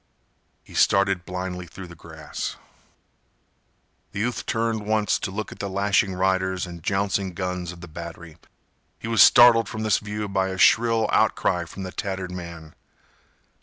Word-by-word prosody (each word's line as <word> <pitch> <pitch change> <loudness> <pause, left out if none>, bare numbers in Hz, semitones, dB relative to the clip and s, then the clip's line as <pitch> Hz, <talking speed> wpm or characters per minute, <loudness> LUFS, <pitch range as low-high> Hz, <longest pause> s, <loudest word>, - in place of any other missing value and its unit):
He - - -16
started 100 -2 +2
blindly 90 -1 -5
through 95 +3 -10
the 85 - -12
grass. 80 -2 -7 1.6
The - - -4
youth 120 +3 -2
turned 115 -1 -1
once 110 -1 +1
to - - -3
look 105 +3 -5
at - - -11
the 100 - -3
lashing 100 0 +1
riders 95 0 0
and 85 -2 -9
jouncing 95 0 -1
guns 90 -1 -3
of 85 -1 -12
the 85 - -9
battery. 85 0 -9 0.6
He - - -7
was 115 -1 +3
startled 120 -2 +7
from 110 0 -5
this 110 -3 +2
view 105 0 -4
by 95 -1 0
a 95 0 -4
shrill 115 +2 +4
outcry 85 -1 +2
from 95 +3 -8
the 95 - -6
tattered 95 -3 -4
man. 85 -3 -8
95 Hz, 160 wpm, -24 LUFS, 90-105 Hz, 1.6 s, startled